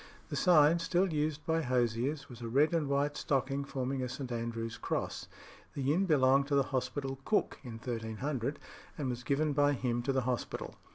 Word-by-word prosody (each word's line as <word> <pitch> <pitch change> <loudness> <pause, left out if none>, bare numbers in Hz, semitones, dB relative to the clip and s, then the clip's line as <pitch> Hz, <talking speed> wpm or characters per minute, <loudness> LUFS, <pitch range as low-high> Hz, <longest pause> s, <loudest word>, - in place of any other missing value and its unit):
The - - -3
sign, 165 -2 +5
still 175 +1 +1
used 150 0 -1
by 165 0 +1
hosiers, 125 +2 0
was 120 -2 -11
a 115 - -4
red 145 +8 +3
and 155 -4 +1
white 140 +1 +1
stocking 135 0 0
forming 135 -1 -2
a 125 - -2
St. 130 -1 -5
Andrew's 115 -1 -3
Cross. - - -3 0.5
This 140 - -2
inn 165 +8 +3
belonged 135 -3 +4
to 145 - +1
the 140 - +4
hospital 135 +1 -2
cook 210 - 0
in 120 - -7
1300, 120 +4 -3 0.4
and 140 -4 -2
was 120 0 -5
given 145 +3 +1
by 145 0 +3
him 120 -2 -1
to 135 +3 0
the 130 -1 +1
hospital. 125 -1 -3
135 Hz, 185 wpm, -32 LUFS, 125-150 Hz, 0.5 s, sign